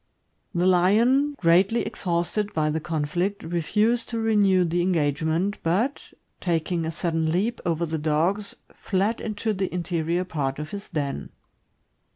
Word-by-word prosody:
The 175 +1 +2
lion, 230 +11 +4
greatly 185 +7 +3
exhausted 180 +4 -1
by 155 -1 +1
the 160 - -1
conflict, 175 +5 -2
refused 210 +8 +1
to 230 - -3
renew 205 -5 +3
the 175 +1 0
engagement, 165 +2 0
but, 210 +12 -1 0.3
taking 170 -1 -1
a 160 - -2
sudden 165 -1 -1
leap 210 +8 0
over 170 0 0
the 160 -1 -3
dogs, 165 +7 0 0.2
fled 200 +4 -1
into 215 0 -2
the 190 -1 -2
interior 170 0 -1
part 140 -6 -2
of 150 +1 -6
his 200 0 -7
den. 145 -3 -3
175 Hz, 140 wpm, -25 LUFS, 160-205 Hz, 0.3 s, lion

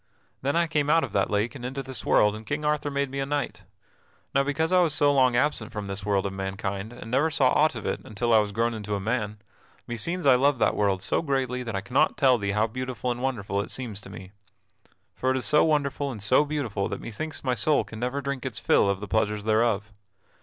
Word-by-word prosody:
Then 140 +3 0
I 170 0 +3
came 150 -3 0
out 165 +1 +4
of 130 - -4
that 100 - +1
lake 105 +3 0
and 135 -4 -9
into 135 +2 -4
this 130 -3 -6
world 105 0 +3
and 110 - -8
King 145 +5 -3
Arthur 150 -1 0
made 140 -1 -1
me 140 - -4
a 135 - 0
knight. 145 0 -3 0.7
Now 140 - +4
because 160 +4 -1
I 185 0 +5
was 160 -4 +2
so 145 0 +4
long 130 -3 +4
absent 120 -4 0
from 105 -1 -5
this 100 0 -5
world 100 -1 +1
of 100 - -3
mankind 95 +2 -4
and 120 -2 -10
never 140 +5 +3
saw 135 -4 +3
aught 155 -3 +3
of 115 - -6
it - - -1
until 115 +2 -1
I 110 - +7
was 105 -1 -1
grown 115 +3 0
into 105 -2 -3
a - - -2
man, 105 0 -2 0.5
meseems 165 +10 -2
I 135 - +7
love 135 +2 +3
that - - +2
world 100 -2 +1
so - - +1
greatly 135 -4 -1
that 115 -4 -5
I 95 - -1
cannot 130 +6 +1
tell 130 -3 +4
thee 100 -1 -1
how 105 +1 +2
beautiful 125 +1 -3
and 120 0 -4
wonderful 100 -7 -1
it - - -7
seems 115 -6 -5
to 100 - -12
me. 95 -2 -10 0.8
For 130 - -1
it 130 - +2
is 125 - -4
so 150 +7 +4
wonderful 145 -2 0
and 115 - -7
so 130 +9 +4
beautiful 125 -10 -2
that 100 - -4
methinks 155 +8 -6
my 130 -2 +1
soul 140 +6 +2
can 110 - -10
never 125 +4 -2
drink 140 -2 -4
its - - -5
fill 100 - +3
of 100 0 -1
the 105 - -5
pleasures 105 +1 0
thereof. 110 -1 +1
120 Hz, 245 wpm, -26 LUFS, 105-140 Hz, 0.8 s, I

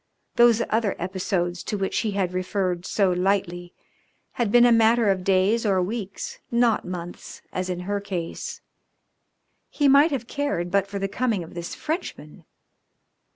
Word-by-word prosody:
Those 235 -1 +5
other 220 -3 +1
episodes 180 -1 -2
to 210 - -2
which 195 -1 -1
he 215 -3 -1
had 190 -2 -1
referred 185 -1 -2
so 195 -2 +2
lightly 180 -1 -1 0.6
had 235 -4 -1
been 240 +1 +6
a 240 - +5
matter 225 -1 +4
of 185 -1 -2
days 195 +4 +2
or 195 -4 +2
weeks, 200 +1 -4
not 235 -2 +2
months, 175 -1 -8
as 185 0 -2
in 180 -1 -3
her 200 +3 -2
case. 200 - -5 1.1
He 290 - +1
might 280 +4 +6
have 265 -6 -3
cared 235 -11 -2
but 200 0 +2
for 200 0 -5
the 195 0 -1
coming 210 -2 -1
of 165 - -12
this 170 0 -6
Frenchman. 320 +4 -5
195 Hz, 155 wpm, -24 LUFS, 180-230 Hz, 1.1 s, been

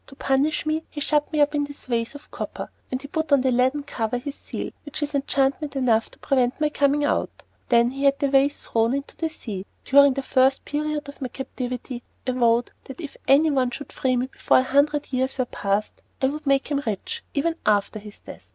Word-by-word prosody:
To 275 - -13
punish 275 +4 +1
me, 310 +1 0
he 295 - -7
shut 295 +1 +1
me 305 -2 +2
up 290 +1 +3
in 290 -1 +1
this 285 0 -8
vase 235 +1 -1
of 285 - -12
copper, - - -6 0.2
and 255 - -1
he 280 - -9
put 315 +1 -2
on 280 -2 +6
the 260 0 +2
leaden 260 +4 +2
cover 235 -4 -2
his 275 +3 -5
seal, - - -6
which 295 0 -4
is 295 - -3
enchantment 280 +1 0
enough 235 -4 +2
to - - -16
prevent 255 -1 +1
my 305 0 +2
coming 290 0 +2
out. - - -1 0.3
Then 235 0 +4
he 275 +1 -3
had 275 0 +4
the 285 -1 +1
vase 275 +1 +2
thrown 230 +3 +1
into 280 +1 -5
the 325 - -2
sea. 210 -11 -6 0.2
During 280 0 +6
the 275 - -2
first 265 +1 +3
period 300 0 -2
of 280 - -11
my 260 - -1
captivity 250 -1 -5 0.2
I 255 - +1
vowed 240 -1 +2
that 265 - -10
if 300 -5 -7
anyone 275 -2 +4
should 275 +3 -8
free 255 -1 +1
me 245 - +1
before 260 - +2
a 255 - +4
hundred 285 +2 +1
years 260 +1 0
were 255 - +1
passed, 200 -2 -1 0.3
I 265 - +2
would 300 +1 -6
make 275 +1 +2
him 285 -1 +1
rich 205 -4 -3
even 325 +4 +1
after 210 0 +2
his 210 0 -11
death. - - -12
275 Hz, 225 wpm, -24 LUFS, 250-290 Hz, 0.3 s, on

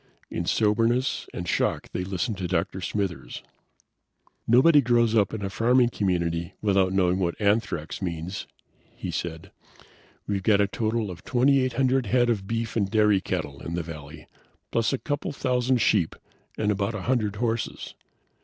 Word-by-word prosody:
In - - -2
soberness 115 +4 +1
and - - -6
shock - - 0
they 90 - -2
listened 95 +2 -3
to 90 - -2
Dr. 95 +1 -1
Smithers. 95 -2 -3 1.0
"Nobody 145 +6 +6
grows 120 -2 +3
up 105 -4 +3
in 110 -2 -5
a - - -2
farming 120 +3 +3
community 85 -6 -1
without 95 -3 +2
knowing 95 -1 +2
what 85 -2 -1
anthrax 100 -7 0
means," 85 +1 -4 0.5
he - - -5
said. 80 -1 -5 0.7
"We've 100 -1 -1
got 100 +1 +3
a 100 - +4
total 110 0 -1
of 85 - -10
twenty 130 +3 +3
eight 130 -1 0
hundred 130 -1 +1
head 120 +1 +3
of 100 -4 -2
beef 115 0 -2
and 100 -4 +1
dairy 105 -3 +3
cattle 70 -5 -4
in 85 - -4
the 85 - -2
valley, 75 -1 -9 0.5
plus 115 -1 +1
a 135 - 0
couple 145 +2 -3
of - - -7
thousand 125 -1 +1
sheep, 95 -7 +2 0.4
and 105 -1 +1
about 100 +2 -1
a 100 - -5
hundred 110 -5 0
horses. 115 +1 -2
105 Hz, 165 wpm, -26 LUFS, 90-120 Hz, 1.0 s, Nobody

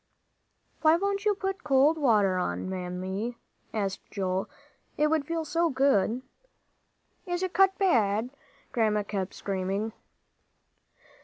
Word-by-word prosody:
"Why 315 +1 +5
don't 400 +2 -1
you 415 -1 +3
put 385 0 -3
cold 280 +2 +4
water 205 -9 +3
on, 90 - -2
Mammy?" 190 +5 -4 0.3
asked 195 -3 -3
Joel; 190 -1 -2 0.5
"it 300 0 +2
would 310 -3 +1
feel 330 -1 -2
so 335 +3 +1
good." 260 -4 +2 1.0
"Is 350 +1 -1
it 370 - -2
cut 385 0 +4
bad?" 235 - +2 0.4
Grandma 215 -3 +1
kept 200 -2 -4
screaming. 195 +3 -2
235 Hz, 120 wpm, -28 LUFS, 195-330 Hz, 1.0 s, Why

